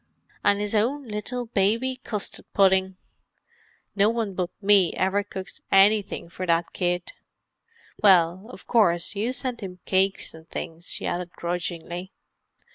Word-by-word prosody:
"An' 205 0 +3
'is 210 0 -2
own 250 +6 0
little 230 +4 -4
baby 230 +5 0
custid 210 -3 -5
puddin'. 190 -1 +3 1.0
No 205 +1 +4
one 225 -3 -2
but 180 -1 -2
me 200 -3 +5
ever 195 +2 +1
cooks 190 -2 -8
anythink 200 -3 +3
for 185 +2 -5
that 170 0 +1
kid. 175 -1 -1 0.9
Well, 185 -1 +4
of - - -12
course, 175 -7 +2
you 215 +4 -1
send 250 -2 -4
'im 185 -2 -7
cakes 190 +1 +1
an' 160 0 -13
things," 165 +1 -6
she - - -3
added 175 0 -2
grudgingly. 175 +1 -4
195 Hz, 135 wpm, -25 LUFS, 180-215 Hz, 1.0 s, me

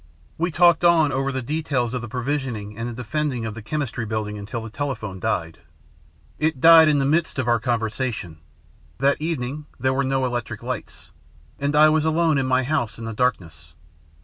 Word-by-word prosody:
We 170 +2 +1
talked 170 +1 +4
on 165 -4 +5
over 135 +1 -1
the 130 -1 -3
details 135 -4 -1
of 125 - -2
the 120 - -6
provisioning 125 -4 -3
and 115 +2 -4
the - - -6
defending 125 +1 -2
of 110 - -4
the 110 - -8
Chemistry 125 -1 -3
Building 110 -1 -3
until 105 +3 -6
the 110 - -8
telephone 110 -9 -4
died. 80 -3 -2 0.8
It 155 -3 0
died 165 +1 +8
in 150 -1 +3
the 135 - +1
midst 160 +3 +1
of 130 -2 -1
our 120 -1 +3
conversation. 110 -7 -3 0.6
That 140 +2 +1
evening 150 -2 -3
there 130 +2 +1
were 135 +1 +1
no 135 0 0
electric 120 -3 -4
lights, 125 -2 -6 0.5
and 145 +1 -1
I 155 +1 +7
was 155 0 +2
alone 160 -2 +2
in 130 - -1
my 130 0 +2
house 130 -5 -1
in 115 - -7
the 115 - -4
darkness. 110 -8 -2
130 Hz, 190 wpm, -23 LUFS, 115-150 Hz, 0.8 s, died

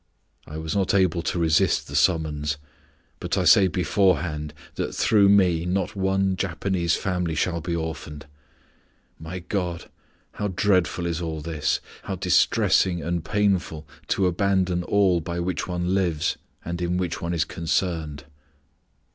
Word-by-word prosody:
I 75 - -7
was 80 +2 -4
not 100 0 +1
able 90 -3 +2
to 85 - -2
resist 80 -2 +2
the 70 - -7
summons, 75 -2 +1 0.6
but - - -2
I - - +2
say 95 - +6
beforehand 85 -4 0 0.2
that - - -4
through 100 -3 +4
me 90 -5 +4
not 95 +3 -1
one 95 0 +1
Japanese 90 -2 -1
family 90 -4 -2
shall 85 0 -1
be 85 +1 -2
orphaned. 80 -2 -5 0.9
My 85 +3 -6
God! 90 -2 -4 0.4
how 105 - -3
dreadful 90 -2 +1
is 85 0 -2
all 80 -2 -3
this 80 -1 -1 0.2
how - - -3
distressing 90 -3 +2
and 85 -1 -2
painful 95 -7 0 0.2
to 95 - +1
abandon 90 0 +1
all 95 -2 +2
by 85 +2 -4
which 90 0 -2
one 90 0 -1
lives 85 -5 0 0.3
and 85 +1 -4
in 90 +1 0
which 90 -3 -2
one 85 +1 -2
is 80 - +1
concerned." 80 -3 -2
85 Hz, 145 wpm, -24 LUFS, 80-95 Hz, 0.9 s, say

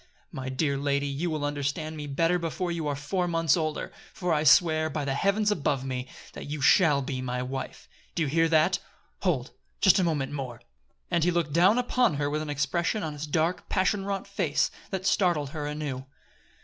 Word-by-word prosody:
"My 130 -1 -5
dear 140 +1 0
lady, 140 0 0
you 145 +5 -2
will 155 -2 -2
understand 145 +2 -2
me 150 -1 -6
better 165 +5 +1
before 170 +2 -2
you 165 -3 -2
are 145 - -1
four 175 +6 -1
months 165 -3 +2
older; 155 -3 -2 0.2
for 180 -2 0
I 150 -1 +1
swear, 155 +1 +5
by 150 -2 -3
the 135 - 0
heaven 200 +8 +1
above 140 -7 0
me! 130 -1 -3 0.3
that - - -8
you 150 +1 -3
shall 150 0 +4
be 130 -1 -3
my 125 0 -2
wife! 130 0 -6 0.3
Do 170 - +1
you - - 0
hear 165 +3 +2
that? 160 +3 +3 0.4
Hold! 145 -10 0 0.3
Just 190 0 +5
a - - +3
moment 150 -6 0
more." 130 -5 -5 0.5
And 170 -2 +2
he 175 - +3
looked 170 -4 0
down 185 +7 +5
upon 245 -6 +2
her 145 0 -1
with 150 +1 -1
an 155 - -5
expression 165 +8 0
on 155 -2 -3
his 150 +1 -6
dark, 160 +4 0
passion 195 +1 +1
wrought 195 -1 -3
face 185 -7 0 0.2
that 190 -1 -4
startled 175 -8 +2
her 150 -2 -4
anew. 145 -3 -4
155 Hz, 200 wpm, -27 LUFS, 140-175 Hz, 0.5 s, swear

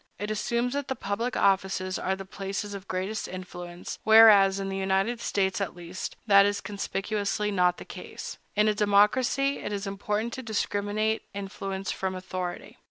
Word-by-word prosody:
It 210 +3 -3
assumes 235 +3 -1
that 285 -1 -2
the 265 - -2
public 230 +3 -2
offices 190 -1 +1
are 190 - 0
the 195 0 -8
places 195 +2 -5
of 200 -1 -8
greatest 190 +4 -3
influence; 175 -1 -7
whereas, 210 -3 +7
in 195 - -3
the 195 - -3
United 195 +5 0
States, 195 0 0
at 195 - -3
least, 175 +1 -6
that 200 -2 +7
is 205 0 +1
conspicuously 205 0 -2
not 180 -2 +2
the - - -9
case. - - -8 0.2
In 210 +1 +4
a 215 - +3
democracy, 215 +7 +3
it 205 - -5
is 200 0 -3
important 210 +3 -2
to 260 - -5
discriminate 215 -1 -1
influence 195 -1 -4
from 190 -1 -3
authority. 185 -1 -5
200 Hz, 165 wpm, -27 LUFS, 190-215 Hz, 0.2 s, whereas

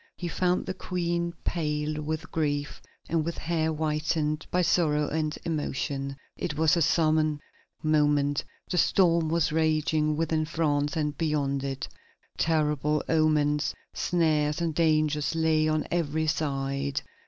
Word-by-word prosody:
He 175 - -4
found 180 +1 0
the 190 - -3
Queen 170 -2 -2
pale 150 -2 -1
with 155 +1 -4
grief 145 -2 -2 0.3
and 165 -1 +1
with 170 +1 -4
hair 160 -1 0
whitened 155 0 -1
by 180 0 +1
sorrow 155 -3 +2
and 155 0 -2
emotion. 140 -3 -2 0.2
It 160 -4 -4
was 160 +1 +4
a 170 - +1
solemn 155 -2 +2 0.4
moment. 145 -2 +2 0.3
The 180 - +2
storm 170 -3 +3
was 165 -1 +1
raging 155 -1 +1
within 160 0 0
France 150 -2 0
and 150 -2 -1
beyond 145 -4 0
it. 135 -1 -3 0.5
Terrible 150 -2 +1
omens, 150 -3 +2 0.2
snares, 155 -3 +1
and 165 -2 -1
dangers 155 -2 +1
lay 160 -1 +2
on 155 0 0
every 160 -2 0
side. 140 -2 -1
155 Hz, 130 wpm, -27 LUFS, 150-165 Hz, 0.5 s, was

